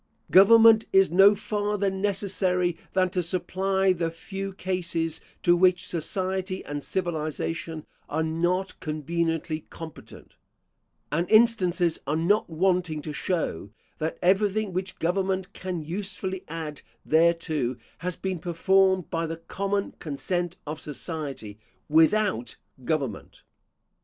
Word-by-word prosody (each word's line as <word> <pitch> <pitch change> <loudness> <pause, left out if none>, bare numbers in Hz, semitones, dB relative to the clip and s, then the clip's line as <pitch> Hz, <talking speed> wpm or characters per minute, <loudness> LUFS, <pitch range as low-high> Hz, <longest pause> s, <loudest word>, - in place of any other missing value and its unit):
Government 225 +3 +7
is 195 -2 +5
no 195 +3 +7
farther 205 -1 -1
necessary 190 -2 0 0.2
than 185 -1 +2
to 180 -1 0
supply 190 +2 +1
the 170 -2 -1
few 195 +4 -6
cases 170 -4 -2 0.2
to 175 - +5
which 180 0 +3
society 185 +2 -2
and 145 0 -4
civilisation 160 -2 -3 0.2
are 160 - 0
not 175 +4 -1
conveniently 160 +1 -2
competent; 160 -2 -11 0.8
and 165 +4 0
instances 190 -7 +3
are 150 - +1
not 175 +7 +2
wanting 175 -2 0
to 155 - -5
show, 150 - -2 0.3
that 160 +1 -2
everything 200 +2 +2
which 185 +1 -3
government 190 +2 -1
can 180 -3 -4
usefully 190 +2 -4
add 155 -2 -6 0.2
thereto, 160 -5 +2 0.2
has 180 0 -3
been 190 -2 -3
performed 190 +2 +2
by 165 0 -1
the 165 +1 -5
common 200 +4 -2
consent 175 +4 -3
of 155 +1 -5
society, 140 - -6 0.3
without 160 - +3 0.3
government. 135 -7 -3
180 Hz, 115 wpm, -26 LUFS, 160-190 Hz, 0.8 s, Government